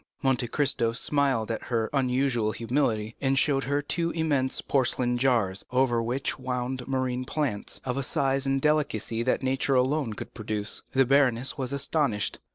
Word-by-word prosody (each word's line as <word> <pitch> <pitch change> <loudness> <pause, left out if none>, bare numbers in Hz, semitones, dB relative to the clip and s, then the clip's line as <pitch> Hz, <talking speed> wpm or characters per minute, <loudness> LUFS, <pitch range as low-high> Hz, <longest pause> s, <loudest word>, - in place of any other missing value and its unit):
Monte 125 -3 +2
Cristo 120 -4 0
smiled 135 -4 +1
at 115 - -4
her 115 -2 0
unusual 125 -4 +1
humility, 115 -3 -1
and 135 -1 +2
showed 135 0 +2
her 140 +2 0
two 170 +3 -1
immense 145 -6 0
porcelain 125 -2 +1
jars, 115 -7 +1
over 125 -2 +2
which 125 +2 -2
wound 125 0 -3
marine 130 -1 -1
plants, 130 -6 -3
of 125 0 -2
a - - 0
size 135 -1 0
and 135 0 +2
delicacy 135 -7 0
that 130 +2 0
nature 135 +1 +1
alone 130 -1 +1
could 110 +3 -8
produce. 105 -2 -3
The 135 0 +4
baroness 130 -2 +2
was 130 -2 -3
astonished. 140 -5 0
130 Hz, 160 wpm, -27 LUFS, 120-140 Hz, -, The